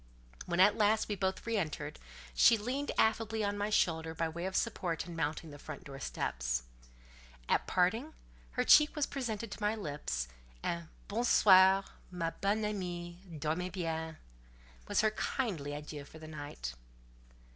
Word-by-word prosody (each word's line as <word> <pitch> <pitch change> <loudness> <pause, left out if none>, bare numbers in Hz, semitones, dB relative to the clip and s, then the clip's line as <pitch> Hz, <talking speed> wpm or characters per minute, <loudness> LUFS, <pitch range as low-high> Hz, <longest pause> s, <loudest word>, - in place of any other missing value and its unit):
When 175 0 -1
at 205 +2 +7
last 215 +1 +3
we 210 - -1
both 190 0 -1
re 230 -1 0
entered, 155 - -3 0.3
she 225 - +6
leaned 260 +7 -2
affably 220 0 +2
on 205 0 0
my 205 +1 -1
shoulder 160 -5 +1
by 165 0 0
way 170 +3 -4
of 190 - -5
support 180 -7 -1
in 175 -2 -8
mounting 160 0 -2
the 145 - -10
front 150 0 -8
door 135 -1 -9
steps; - - -2 0.8
at - - +2
parting, 225 - +1 0.4
her 250 - +1
cheek 300 +4 +7
was 300 -2 +1
presented 230 -5 -4
to 210 - -7
my 210 +1 +2
lips, 145 - -3 0.4
and 170 -1 -2 0.2
"Bon 225 +4 -1
soir, 190 -4 +7 0.3
my 170 -2 -2
bonne 210 +4 0
amie; 175 -4 -4
dormez 160 +3 -2
bien!" 160 -3 -3 0.7
was - - +2
her 215 0 +3
kindly 200 - -2
adieu 150 0 -7
for 145 - -13
the 155 0 -10
night. 145 - -6
180 Hz, 160 wpm, -33 LUFS, 160-215 Hz, 0.8 s, at